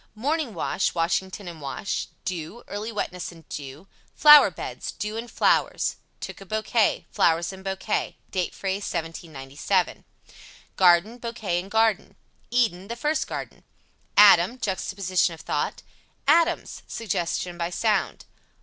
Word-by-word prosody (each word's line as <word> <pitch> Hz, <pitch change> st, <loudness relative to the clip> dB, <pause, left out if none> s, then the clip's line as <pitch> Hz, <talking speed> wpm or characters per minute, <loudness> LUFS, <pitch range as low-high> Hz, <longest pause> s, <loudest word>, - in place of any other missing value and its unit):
Morning 280 Hz, -, -1 dB
wash 175 Hz, +3 st, -1 dB
Washington 185 Hz, +3 st, -1 dB
and 165 Hz, -3 st, -8 dB
wash. 140 Hz, +8 st, -3 dB, 0.2 s
Dew 185 Hz, +4 st, -5 dB
Early 210 Hz, +3 st, -5 dB
wetness 180 Hz, -5 st, -4 dB
and 165 Hz, -2 st, -16 dB
dew. 145 Hz, +4 st, -7 dB, 0.3 s
Flower 300 Hz, -1 st, +9 dB
beds -, -, -6 dB
Dew 210 Hz, +1 st, -5 dB
and 230 Hz, +1 st, -5 dB
flowers. -, -, +1 dB, 0.2 s
(Took -, -, -7 dB
a -, -, -9 dB
bouquet) 215 Hz, +2 st, +1 dB
Flowers 165 Hz, +2 st, +2 dB
and 190 Hz, 0 st, -11 dB
bouquet. 195 Hz, +2 st, -2 dB
Date 185 Hz, -2 st, -2 dB
phrase 195 Hz, 0 st, -2 dB
(1797), 165 Hz, +1 st, -2 dB, 0.7 s
Garden 185 Hz, +6 st, +4 dB
Bouquet 220 Hz, -7 st, -2 dB
and 190 Hz, +2 st, -8 dB
garden. 220 Hz, 0 st, +1 dB, 0.3 s
Eden 215 Hz, -7 st, +1 dB
The 235 Hz, -, -4 dB
first 305 Hz, +5 st, -1 dB
garden. -, -, -7 dB, 0.5 s
Adam 205 Hz, +2 st, +7 dB
Juxtaposition 185 Hz, -4 st, 0 dB
of -, -, -13 dB
thought. -, -, -2 dB, 0.4 s
ADAMS 335 Hz, +3 st, +2 dB
Suggestion 175 Hz, -4 st, -2 dB
by 170 Hz, 0 st, -1 dB
sound. 210 Hz, +2 st, 0 dB
190 Hz, 130 wpm, -25 LUFS, 175-225 Hz, 0.7 s, Flower